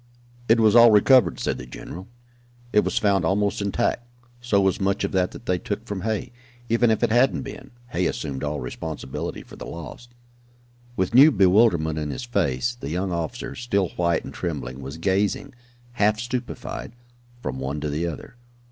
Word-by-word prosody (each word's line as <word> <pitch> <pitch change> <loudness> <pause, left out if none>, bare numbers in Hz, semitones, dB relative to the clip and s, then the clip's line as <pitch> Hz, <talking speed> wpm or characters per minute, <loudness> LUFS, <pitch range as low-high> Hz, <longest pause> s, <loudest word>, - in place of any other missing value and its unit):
"It 115 +1 +5
was 110 -1 +4
all 120 0 +9
recovered," 110 - +5
said - - -2
the - - -8
general. 90 +8 -9 0.7
"It 105 - +5
was - - -2
found 100 -3 +2
almost 100 +4 +1
intact 100 +4 0 0.4
so 120 -4 +2
was 95 0 +1
much 100 +2 0
of - - -1
that 90 -2 +1
that - - -12
they 90 -1 0
took 105 +4 -4
from 100 -4 -4
Hay. 110 +3 -2 0.4
Even 115 +1 +3
if 110 - +1
it - - +2
hadn't 125 +3 +3
been, 135 - -9 0.2
Hay 90 -6 0
assumed 70 -3 -4
all 75 0 -2
responsibility 75 -3 -5
for - - -14
the - - -8
loss." 85 +9 -9 0.9
With 95 +1 -1
new 135 +5 +9
bewilderment 90 - +3
in 75 -1 -3
his 130 - -5
face, 100 - 0
the 120 - -7
young 90 +4 -2
officer, 85 +8 -4
still 100 -7 0
white 85 -1 0
and - - -8
trembling, 70 -6 -4
was 70 +3 -7
gazing, 95 +7 0 0.4
half 105 -2 +2
stupefied, 120 -1 -5 0.5
from 65 -1 -3
one 70 +3 -3
to 75 - -2
the 80 +4 -1
other. 85 +9 -8
100 Hz, 180 wpm, -24 LUFS, 80-115 Hz, 0.9 s, all